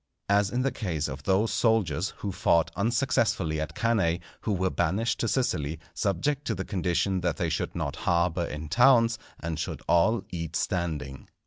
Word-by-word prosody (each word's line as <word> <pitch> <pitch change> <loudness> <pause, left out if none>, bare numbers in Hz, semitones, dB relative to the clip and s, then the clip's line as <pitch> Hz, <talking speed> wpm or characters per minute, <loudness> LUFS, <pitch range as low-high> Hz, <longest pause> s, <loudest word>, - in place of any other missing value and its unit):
As 100 0 +3
in 125 +2 -1
the 135 - +1
case 85 - -2
of 65 -1 -6
those 95 +8 +1
soldiers 100 - +1
who 100 - -3
fought 85 -2 +2
unsuccessfully 100 - +1
at 80 +1 -5
Cannæ, 105 -7 +1 0.2
who 110 - -2
were 95 -1 +1
banished 105 +7 0
to 115 - 0
Sicily, 80 - 0
subject 110 +9 0
to - - -1
the 95 - -4
condition 95 0 0
that 85 -2 -1
they 85 - 0
should 80 - -2
not - - -3
harbour 85 0 +1
in 75 0 -6
towns, 115 - +4 0.2
and 80 -1 -3
should - - -4
all 110 +7 +3
eat 85 -2 -4
standing. 80 -7 -2
90 Hz, 175 wpm, -27 LUFS, 80-110 Hz, 0.2 s, towns